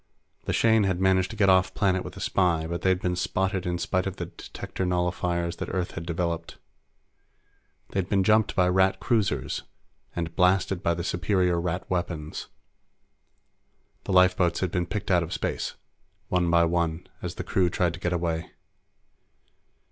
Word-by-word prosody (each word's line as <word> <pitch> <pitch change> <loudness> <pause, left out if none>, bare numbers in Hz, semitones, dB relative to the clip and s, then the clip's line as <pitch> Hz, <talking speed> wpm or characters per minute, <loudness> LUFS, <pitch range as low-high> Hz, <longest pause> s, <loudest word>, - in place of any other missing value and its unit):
The - - -1
Shane 110 -2 +4
had 95 -2 0
managed 95 0 +3
to - - -7
get 105 -2 +3
off 95 -1 +4
planet 95 -2 +1
with - - -8
the - - -8
spy, 85 -4 +1
but 85 +1 -4
they'd 95 -1 +2
been 90 -1 0
spotted 95 0 -1
in 90 0 0
spite 95 +2 -1
of 95 - -4
the - - -4
detector - - -7
nullifiers 90 -1 -1
that - - -4
Earth 90 -1 -2
had 85 0 -7
developed. 85 -1 -2 1.3
They'd 95 -1 -1
been 100 -2 +3
jumped 110 +2 +3
by 90 -2 +4
Rat 95 +1 +3
cruisers 95 - 0 0.5
and 85 -1 -3
blasted 90 +1 +2
by 85 -3 +1
the 85 - -4
superior 90 0 +1
Rat 90 +1 -3
weapons. 85 -4 -3 1.6
The - - -2
lifeboats 90 -1 +4
had 95 -3 0
been 90 -2 -1
picked 100 +1 -3
out 90 -1 +4
of 85 +2 -4
space, - - -3 0.5
one 90 -1 +2
by 85 0 +5
one, 85 0 -1 0.2
as 90 -1 -5
the - - -4
crew 90 -2 +1
tried 85 0 0
to 90 - -8
get 90 -1 -1
away. 85 -2 -1
90 Hz, 170 wpm, -26 LUFS, 85-95 Hz, 1.6 s, by